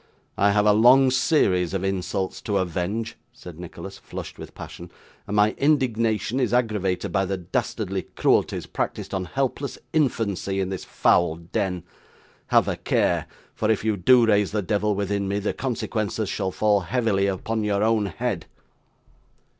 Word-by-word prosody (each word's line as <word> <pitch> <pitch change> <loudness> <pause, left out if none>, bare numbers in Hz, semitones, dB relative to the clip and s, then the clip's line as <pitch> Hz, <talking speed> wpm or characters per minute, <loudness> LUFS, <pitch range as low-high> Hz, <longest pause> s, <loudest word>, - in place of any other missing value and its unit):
'I 100 +1 +3
have 105 0 +3
a 105 - +6
long 130 +5 +6
series 95 - +2
of 95 - -2
insults 95 0 -2
to 100 -2 -1
avenge,' 95 +5 -2
said 85 -2 -12
Nicholas, 90 -2 -9
flushed - - -8
with - - -10
passion; 85 0 -9 0.4
'and 100 - -3
my 105 +1 +4
indignation 120 -5 +1
is 120 -2 +1
aggravated 105 -7 0
by 95 -1 +1
the 95 0 -2
dastardly 90 -2 -2
cruelties - - +2
practised - - -4
on 95 -1 -1
helpless 135 +6 -2 0.2
infancy 105 - 0
in 95 -1 -1
this 95 -1 -5
foul 85 -2 +2
den. 85 +1 -3 0.6
Have - - +4
a - - -1
care; - - +1 0.3
for 110 - -1
if 110 -1 +1
you 110 -1 +2
do 120 +6 +5
raise 105 -3 +2
the 105 -1 -1
devil 105 +2 0
within 100 0 -1
me, 100 +1 -1
the 105 0 -1
consequences 110 -4 -2
shall 95 -2 -1
fall 105 +2 +2
heavily 100 -1 0
upon 110 +3 -2
your 105 -1 +1
own 110 -2 +2
head! 105 -3 -3
105 Hz, 160 wpm, -24 LUFS, 95-115 Hz, 0.6 s, a